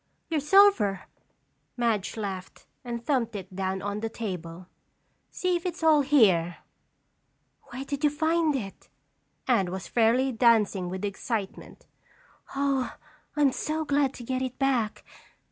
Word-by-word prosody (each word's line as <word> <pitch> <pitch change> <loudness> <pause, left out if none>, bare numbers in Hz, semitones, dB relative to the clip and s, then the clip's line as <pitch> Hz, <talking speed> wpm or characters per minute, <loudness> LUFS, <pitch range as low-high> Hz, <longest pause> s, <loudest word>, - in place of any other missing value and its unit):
"Your 315 - +2
silver," 300 - +4 0.8
Madge 230 -4 0
laughed 190 -3 -6 0.2
and 235 -1 -5
thumped 245 -6 0
it 190 -2 -7
down 190 0 -2
on 205 +1 -3
the 225 +1 -3
table. 180 -6 -6 0.6
"See 365 -1 -1
if 345 - -3
it's 350 -2 -4
all 310 -2 +6
here." 195 - +3 1.1
"Where 260 +3 -6
did 285 +1 -4
you 295 - +5
find 315 +1 +1
it?" 200 -7 -6 0.6
Anne 215 -8 +2
was 190 0 -5
fairly 245 +3 +2
dancing 220 -6 +3
with 185 +2 -4
excitement. 200 0 -5 0.7
"Oh, 275 -2 0 0.4
I'm 290 -3 +4
so 310 +4 -2
glad 285 -2 +1
to 245 - -9
get 255 +2 -2
it 255 -1 -4
back. 255 -6 0
240 Hz, 135 wpm, -27 LUFS, 200-285 Hz, 1.1 s, all